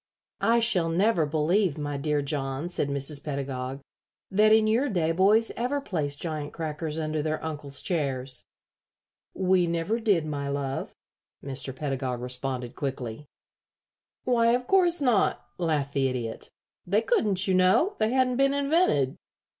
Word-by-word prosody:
"I 235 +1 +4
shall 180 -8 +4
never 175 -1 +2
believe, 160 +3 +1
my 145 -1 -3
dear 145 +1 0
John," 140 +2 -3
said 145 -5 -2
Mrs. 140 +1 -3
Pedagog, 135 -2 -4 0.5
"that 210 +2 +4
in 220 0 +5
your 235 +6 +2
day 170 -6 +1
boys 205 +6 +3
ever 255 +5 -1
placed 150 - -3
giant 155 -3 -4
crackers 155 -1 -4
under 155 -1 -1
their 155 +1 -2
uncles' 145 -3 -4
chairs." 135 -6 -1 0.9
"We 185 -2 +2
never 170 +7 -1
did, 200 -8 +2
my 140 -2 -3
love," 140 -1 -3 0.5
Mr. 135 -1 -3
Pedagog 130 -3 -3
responded, 125 0 -4
quickly. 135 -1 -5 1.0
"Why, 235 -2 +3
of 250 0 -3
course 350 -1 +3
not," 245 -7 +2
laughed 150 -5 -1
the 135 -1 +2
Idiot. 120 -3 -4 0.4
"They 205 +5 +2
couldn't, 205 -4 +2
you 190 - +2
know. 185 - +4
They 215 0 +2
hadn't 255 0 +1
been 275 +1 +3
invented. 280 - +2
160 Hz, 145 wpm, -27 LUFS, 140-215 Hz, 1.0 s, in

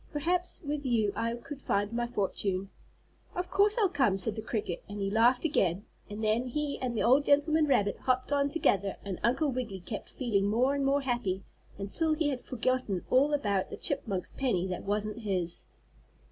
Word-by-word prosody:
Perhaps 350 +5 -1
with 290 0 -2
you 225 -6 +1
I 230 +1 -1
could 275 +3 -9
find 205 0 0
my 240 0 0
fortune." 195 -3 -2 0.6
"Of 360 0 -3
course 410 +2 +4
I'll 415 - +5
come," 265 - +2
said 205 +3 -1
the 220 - -4
cricket, 210 -5 -3
and 205 0 -6
he 195 0 -1
laughed 240 +6 +4
again, 195 - +1 0.2
and 210 +2 -5
then 220 +4 +1
he 290 +3 -2
and 245 -3 -2
the - - +1
old 265 +5 +5
gentleman 300 +2 +3
rabbit 205 -7 +2
hopped 255 +1 0
on 285 0 +2
together 200 - +1
and 195 -3 -4
Uncle 270 +6 +2
Wiggily 240 -7 -4
kept 205 +4 -6
feeling 210 -6 0
more 245 +6 +2
and 280 -1 0
more 275 +1 +2
happy 240 -8 -1 0.3
until 310 +11 +1
he 305 -2 +1
had 260 -3 -3
forgotten 255 -6 -1
all 275 +4 +5
about 205 -10 0
the - - -7
chipmunk's 190 -4 -2
penny 235 -10 0
that 180 - -4
wasn't 210 +2 -1
his. 185 -6 -2
240 Hz, 190 wpm, -30 LUFS, 200-280 Hz, 0.6 s, I'll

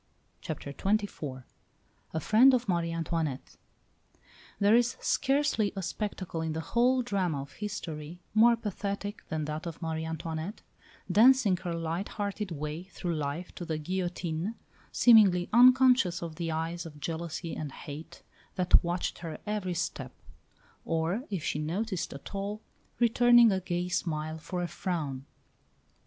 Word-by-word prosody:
CHAPTER 140 - -5
XXIV 190 -10 -2 0.7
A 160 - -1
FRIEND 245 - +6
OF 245 -1 -2
MARIE 170 -3 0
ANTOINETTE 165 -4 -3 1.0
There 205 +2 +5
is 240 0 +2
scarcely 275 -7 +1
a 195 - -3
spectacle 185 -3 -4
in 160 -1 -2
the 160 - -3
whole 250 +2 +4
drama 185 - -1
of 140 - -14
history 170 -6 -6
more 230 +2 +6
pathetic 205 -1 -4
than 155 -1 -2
that 155 +3 -4
of 165 - -7
Marie 160 -1 -3
Antoinette, 160 +4 -5 0.5
dancing 235 -3 +6
her 175 -1 -4
light 165 +4 -3
hearted 205 -1 -3
way 150 0 -4
through 180 -2 -4
life 155 +3 -3
to - - -7
the 160 -2 -2
guillotine, 175 +3 -3 0.4
seemingly 200 -7 +6
unconscious 250 -7 +6
of 165 -2 -6
the 170 -2 -2
eyes 165 +2 -3
of 150 -2 -12
jealousy 165 +2 -4
and 150 -3 -5
hate 155 +5 -9 0.3
that 180 -2 +4
watched 175 +1 -2
her 165 -2 -6
every 205 -4 -2
step; - - -3 0.7
or, 165 +9 -1
if 190 -7 -3
she 150 - -1
noticed 185 +5 -2
at 140 - -9
all, 200 +2 -3 0.4
returning 240 -1 +6
a 190 - +1
gay 175 0 -2
smile 160 -3 -2
for 175 +3 -4
a - - -1
frown. 145 -8 -4
175 Hz, 145 wpm, -29 LUFS, 160-210 Hz, 1.0 s, FRIEND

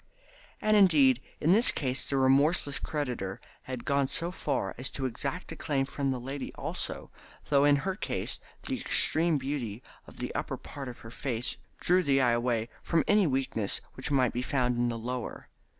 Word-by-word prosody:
And 215 0 +4
indeed 145 - +5 0.2
in 160 - +3
this 225 +6 +6
case 130 -2 -1
the 140 - +1
remorseless 140 +2 +3
creditor 125 -11 -3 0.3
had 130 -2 -6
gone 140 -1 +2
so 170 +5 -2
far 135 - -2
as 130 - -1
to 135 - -4
exact 135 +8 -3
a - - -5
claim 140 -4 0
from 140 0 -2
the 130 -1 -1
lady 135 +2 -5
also, - - -4 0.4
though 140 -1 +5
in 145 -1 +6
her 190 - +1
case - - -3 0.2
the - - -3
extreme 165 -1 +3
beauty 130 -5 -4 0.2
of - - -14
the - - -4
upper - - -3
part 140 -2 -8
of 125 - -9
the 115 - -9
face 125 -1 -2 0.2
drew 180 +1 +3
the 140 -5 +3
eye 125 -2 +4
away 120 -1 +1
from 165 -1 +2
any 205 -3 +4
weakness 130 -7 -1
which 130 - -3
might 130 -4 +2
be 125 - -1
found 125 -2 +1
in 120 0 +1
the 115 - -3
lower. 125 +2 -5
135 Hz, 185 wpm, -29 LUFS, 125-150 Hz, 0.4 s, this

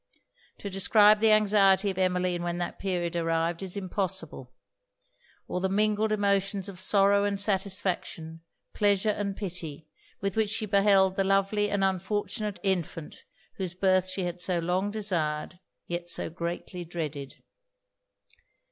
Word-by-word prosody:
To - - -7
describe 205 +2 +5
the 220 +1 +4
anxiety 200 -2 +4
of 185 - -10
Emmeline 180 -1 +1
when 175 0 -2
that 175 - -4
period 175 -3 -2
arrived, 165 +1 0
is 190 0 -2
impossible; 185 -8 -3 1.0
or - - -2
the 190 - 0
mingled 215 +2 +1
emotions 200 -1 +1
of 190 -2 -8
sorrow 200 +1 +4
and 200 -1 -1
satisfaction, 190 -5 -1 0.3
pleasure 205 0 +2
and 200 -1 -3
pity, 165 -6 -6 0.3
with 195 -1 -2
which 220 -2 +1
she 220 +1 -1
beheld 195 -2 +3
the 195 - +3
lovely 195 +2 +1
and 200 -1 0
unfortunate 200 +2 -2
infant 175 -5 -2 0.4
whose 185 -2 -4
birth 185 0 +2
she 185 0 -3
had 175 0 -4
so 180 0 0
long 180 +4 0
desired, 175 -6 -2 0.3
yet 175 0 -4
so 165 - -3
greatly 175 +1 -5
dreaded. 155 -5 -5
190 Hz, 140 wpm, -28 LUFS, 175-200 Hz, 1.0 s, describe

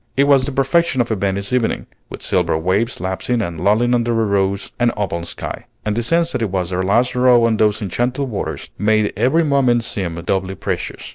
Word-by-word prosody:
It 140 - +5
was 140 -2 +4
the 145 - -3
perfection 135 +3 +1
of 120 -1 +1
a - - +2
Venice 100 +2 -2
evening, 125 -3 0 0.2
with - - -9
silver - - +1
waves 95 +9 0
lapsing 95 +7 -2
and 85 -7 -3
lulling 110 +5 +3
under 120 -1 +1
a 110 - +2
rose 100 -1 0
and 120 -1 +3
opal 95 -4 -2
sky; - - -5 0.2
and 105 -1 0
the 120 - 0
sense 165 +7 +1
that 125 - -2
it 110 - 0
was 90 -1 -2
their 90 0 -1
last 120 +7 +2
row 125 -1 +5
on 115 -1 +1
those 105 0 +1
enchanted 125 +8 -1
waters 110 -5 -5
made 110 +1 +2
every 130 - +2
moment 130 -5 +2
seem 95 -7 -3
doubly 95 +3 -2
precious. - - -4
115 Hz, 210 wpm, -19 LUFS, 95-125 Hz, 0.2 s, It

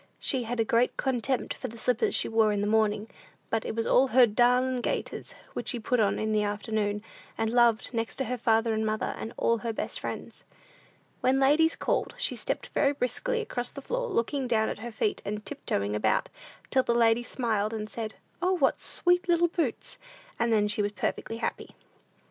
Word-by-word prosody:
She 255 -3 -1
had 240 +1 -3
a 225 - +3
great 235 +3 +2
contempt 260 0 -1
for - - -6
the 230 - -10
slippers 240 +1 +1
she - - +2
wore 225 -1 +3
in 205 -1 0
the - - 0
morning, 215 0 +1 0.4
but 225 -1 +1
it - - -3
was 230 0 -1 0.3
her 255 0 +8
"darlin' 250 +3 +2
gaiters," - - -3 0.2
which - - -5
she 245 - -1
put 245 +2 0
on 205 -2 +2
in 215 0 -1
the 215 -1 +2
afternoon, 210 0 -1 0.3
and 225 0 0
loved 235 -2 +3
next 230 -1 -2
to 250 -2 -2
father 225 0 +2
and 220 0 0
mother, 215 0 -1
and 225 - -5
all 230 -1 +2
her 230 +1 -2
best 220 - -3
friends. - - -7 0.8
When 260 +1 +2
ladies 300 +4 +4
called, - - -1
she - - +1
stepped - - -3
very 280 0 +3
briskly 370 - -1
across 245 - -3
the 280 - -9
floor, - - -2
looking 270 - -1
down 220 -2 +2
at - - -5
her 235 +2 -6
feet, 215 -1 -1
and 210 +1 -4
tiptoeing 100 +1 -2
about, 105 - +1 0.4
till 265 - +4
the 235 -2 0
ladies 230 0 +3
smiled, 220 -4 -1
and 215 -1 -4
said, 220 0 -6 0.3
"O, 365 +1 +2
what 365 - +2
sweet 355 +1 +2
little 345 0 +4
boots!" 335 -1 -3 0.4
and 235 0 +1
then 210 -2 +3
she 210 0 +1
was 205 0 -1
perfectly 225 +2 -3
happy. - - -4
230 Hz, 195 wpm, -28 LUFS, 215-260 Hz, 0.8 s, her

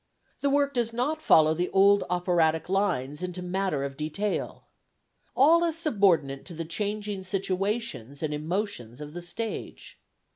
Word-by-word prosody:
The 280 - +1
work 280 0 +2
does 240 -3 0
not 255 +7 -1
follow 155 0 +5
the 175 +3 -1
old 200 +1 +5
operatic 175 -2 +1
lines 175 -7 0
into 180 0 -4
matter 180 -5 -1
of 140 -1 -4
detail. 160 +8 -3 0.7
All 320 +6 +5
is 330 -2 0
subordinate 195 - +2
to 175 - -7
the 165 +1 -4
changing 205 +2 -3
situations 190 - -3
and 150 -1 -1
emotions 150 - -3
of 150 0 -8
the 175 - -6
stage. 220 +6 -6
185 Hz, 145 wpm, -27 LUFS, 155-210 Hz, 0.7 s, follow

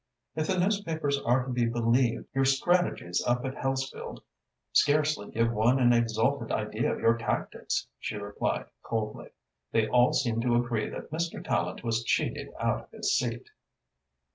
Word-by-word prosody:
"If 155 0 -1
the 190 - +1
newspapers 165 -7 0
are 125 +1 +2
to 130 - -4
be 120 -1 +2
believed, 115 +1 +1
your 135 0 +2
strategies 135 - +1
up 120 +1 0
at 130 - -2
Hellesfield 135 0 -3 0.5
scarcely 150 -6 +3
give 115 +1 +1
one 115 +4 +3
an 120 -1 +5
exalted 115 +2 +1
idea 110 +1 -1
of - - -3
your 115 +1 +3
tactics," 115 -2 -2
she - - -4
replied 100 0 -2 0.2
coldly. 110 -2 -4 0.4
"They 110 -1 +2
all 125 +1 +4
seem 115 -4 +1
to 120 0 +2
agree 120 -2 0
that - - -8
Mr. 165 +2 -3
Tallente - - -1
was 115 -1 0
cheated - - -1
out - - 0
of - - -34
his - - 0
seat." - - -2
120 Hz, 160 wpm, -28 LUFS, 115-140 Hz, 0.5 s, an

